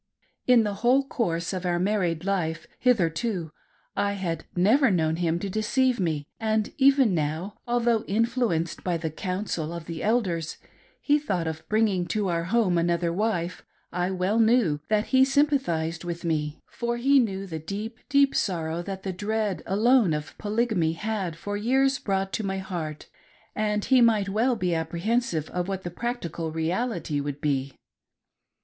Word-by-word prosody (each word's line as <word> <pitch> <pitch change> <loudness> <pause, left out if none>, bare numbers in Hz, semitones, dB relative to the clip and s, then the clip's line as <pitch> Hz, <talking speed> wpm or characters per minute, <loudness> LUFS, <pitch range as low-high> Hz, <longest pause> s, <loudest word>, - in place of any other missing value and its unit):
In 245 -3 +6
the 205 -1 -1
whole 260 +3 +3
course 170 -9 -1
of 185 -1 -3
our 175 -1 +1
married 180 -3 0
life 170 -5 -1
hitherto, 185 -5 +1 0.4
I, 200 0 +1
had 170 -5 -3
never 230 +10 +4
known 160 -4 +1
him 170 -1 +1
to 200 - -4
deceive 235 +5 +1
me, 155 -5 -1
and 220 -1 0
even 270 -5 +5
now, 160 +5 -2
although 240 -2 +2
influenced 225 -6 0
by 175 -2 0
the 160 -1 -3
counsel 180 -2 -3
of 170 -1 -6
the 165 -1 -6
Elders, 190 -8 0 0.4
he 295 0 +3
thought 185 - -2
of 160 0 -5
bring 220 +1 +3
ing 185 -4 -1
to 210 -1 -1
our 170 -1 -1
home 185 -3 +2
another 170 0 +1
wife, 185 -3 -1 0.3
I 180 +1 -1
well 190 +4 0
kn^w 220 -10 +3
that 215 0 +2
he 260 - +6
sympa 285 +1 +4
thised 165 -6 -2
with 170 0 -5
me; 150 -2 -2
for 235 0 -3
he 275 +3 +4
knew 195 -5 -1
the 160 -4 -5
deep, 210 +8 -6
deep 280 0 +4
sorrow 165 -3 -1
that 190 +1 -6
the 190 - -3
dread 210 +1 -1
alone 215 -2 +4
of 150 -1 -6
Polygamy 210 -6 +1
had 195 -2 -3
for 205 +5 -5
years 265 +5 +2
brought 195 -1 -1
to 220 - -1
my 195 -1 -2
heart, 175 -6 -5 0.5
and 210 -1 0
he 260 -2 +5
might 215 -4 +4
well 235 +5 +2
be 180 -5 0
apprehensive 170 +2 -1
of 180 0 -2
what 190 -1 -3
the 175 - -5
practical 175 -7 -4
reality 165 -1 -1
would 145 0 -4
be. 140 -2 -1
195 Hz, 170 wpm, -26 LUFS, 170-225 Hz, 0.5 s, In